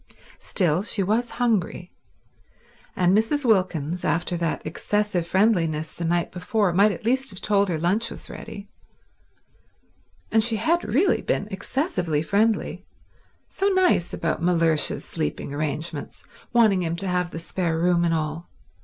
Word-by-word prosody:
Still, 175 -3 +1
she 205 -1 -1
was 225 +5 0
hungry; 215 -7 0 1.0
and 180 +1 +3
Mrs. 240 +7 +1
Wilkins, 180 - +1
after 175 +1 0
that 170 -2 -2
excessive 185 +2 -1
friendliness 170 -6 +1
the 170 - -5
night 170 +1 0
before, 190 +1 0
might 200 +4 +5
at 205 - -7
least 265 +3 +1
have 190 -3 -1
told 200 -2 +1
her 165 - 0
lunch 195 +8 0
was - - -7
ready. 200 0 -9 1.6
And 220 -1 +4
she 230 0 +2
had 325 +11 +1
really 280 - +2
been 205 - -1
excessively 190 - -1
friendly—so 220 - -2
nice 375 - +2
about 165 -1 -2
Mellersh's 165 -3 +1
sleeping 75 - -4
arrangements, 150 +1 -4 0.3
wanting 220 -6 +4
him 165 -1 -1
to 195 +3 -4
have 180 -1 0
the 165 - -7
spare 165 0 -2
room 175 +1 +2
and 165 -1 +2
all. 155 +2 -4
185 Hz, 140 wpm, -24 LUFS, 165-220 Hz, 1.6 s, might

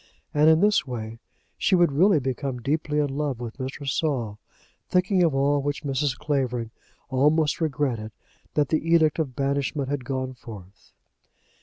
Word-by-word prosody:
And 150 +1 +5
in 160 +1 +5
this 205 -7 +3
way 115 -2 -6 0.4
she 190 - +3
would 175 -3 +4
really 170 +4 +4
become 130 0 -3
deeply 150 +3 -1
in 145 -2 0
love 145 -4 -2
with 120 +2 -7
Mr. 135 +2 -5
Saul; 130 -8 -1 0.5
thinking 185 +1 +2
of 165 -5 +3
all 140 +1 +2
which 145 +2 -3
Mrs. 135 -1 -1
Clavering 125 -6 -1 0.4
almost 150 +5 +2
regretted 135 -8 -1 0.4
that 145 -3 +2
the 155 - +1
edict 160 -2 +4
of 135 -6 -2
banishment 140 0 -1
had 145 -2 -2
gone 130 0 -3
forth. 105 -6 -13
140 Hz, 155 wpm, -25 LUFS, 130-155 Hz, 0.5 s, And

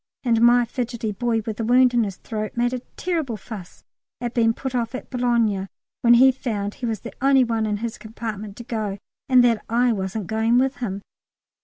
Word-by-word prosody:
And 230 -3 +2
my 240 +1 +6
fidgety 235 -2 -3
boy 225 +2 0
with 220 -2 -4
the 230 - -2
wound 250 +2 +4
in 235 -2 +3
his 195 -2 -5
throat 215 0 -5
made 240 +1 +1
a 255 - -2 0.2
terrible 320 -10 -2
fuss 200 -3 -10 0.4
at 240 0 -4
being 225 -2 +3
put 265 +3 -5
off 240 0 -1
at - - -8
Boulogne 235 -6 +1 0.3
when 240 0 +6
he 260 +2 +7
found 210 -6 -3
he 245 - -5
was 220 -3 -3
the 235 - -8
only 270 -1 +5
one 225 -2 0
in 210 -1 -1
his 230 0 -5
compartment 215 -2 -6
to 235 - -7
go 215 -4 -3 0.3
and 255 -1 +6
that 230 -3 +2
I 240 +1 +3
wasn't 195 0 -3
going 220 +4 +2
with 260 0 +1
him. 200 -5 -4
235 Hz, 205 wpm, -23 LUFS, 215-245 Hz, 0.4 s, he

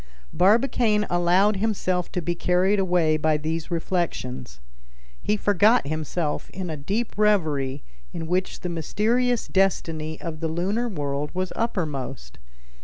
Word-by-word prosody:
Barbicane 215 +1 +3
allowed 180 +4 +3
himself 190 -4 -1
to 180 - -2
be 175 - 0
carried 180 +4 +2
away 175 -4 +2
by 155 0 +2
these 160 +1 -3
reflections. 160 - -3 0.6
He 210 - 0
forgot 205 +3 +4
himself 155 +1 -2
in 185 -3 -5
a - - -3
deep 200 +11 -2
reverie 155 -10 +1 0.3
in 165 - -5
which 180 +3 -1
the 180 - -3
mysterious 225 +9 0
destiny 160 -5 0
of 160 -2 -6
the 165 - -1
lunar 195 +9 -1
world 145 -5 -3
was 185 0 -2
uppermost. 150 - -3
175 Hz, 130 wpm, -24 LUFS, 155-205 Hz, 0.6 s, forgot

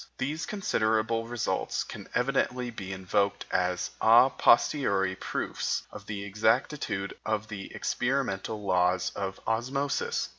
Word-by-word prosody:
These 150 +5 -2
considerable 115 - 0
results 120 -1 -1
can - - -9
evidently 125 -1 0
be 95 -4 -7
invoked 100 +2 0
as 90 0 0
a 120 +4 +7
posteriori 100 -8 +3
proofs - - -2
of 100 -1 -10
the 100 -2 -4
exactitude 105 0 0
of 110 0 -2
the 100 -3 -7
experimental 110 -5 -1
laws 90 -1 +2
of 95 -1 -4
osmosis. 140 - -1
110 Hz, 115 wpm, -29 LUFS, 100-125 Hz, -, a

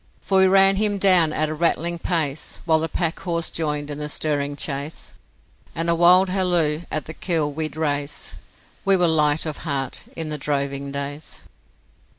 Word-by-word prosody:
For 190 -1 +2
we 190 - +6
ran 195 +1 +5
him 205 -1 +1
down 185 -5 +5
at 155 0 0
a - - -3
rattling 170 +1 0
pace, 160 -5 -1
While 160 -2 +3
the 160 +1 -2
packhorse 170 0 -2
joined 150 -2 -2
in 145 - -5
the 150 0 -4
stirring 145 -1 0
chase. 145 +1 -4 0.6
And 165 +1 0
a - - +4
wild 180 +3 +5
halloo 175 -5 +1
at 155 - -3
the 160 - -8
kill 160 -4 0
we'd 155 +1 -4
raise 145 -2 -2 0.5
We 195 -1 +3
were 175 -1 +3
light 150 -1 +2
of 155 -2 -4
heart 140 -5 -3
in 160 -2 -3
the 150 -1 -4
droving 140 -1 -2
days. 140 +2 -6
160 Hz, 170 wpm, -22 LUFS, 145-175 Hz, 0.6 s, we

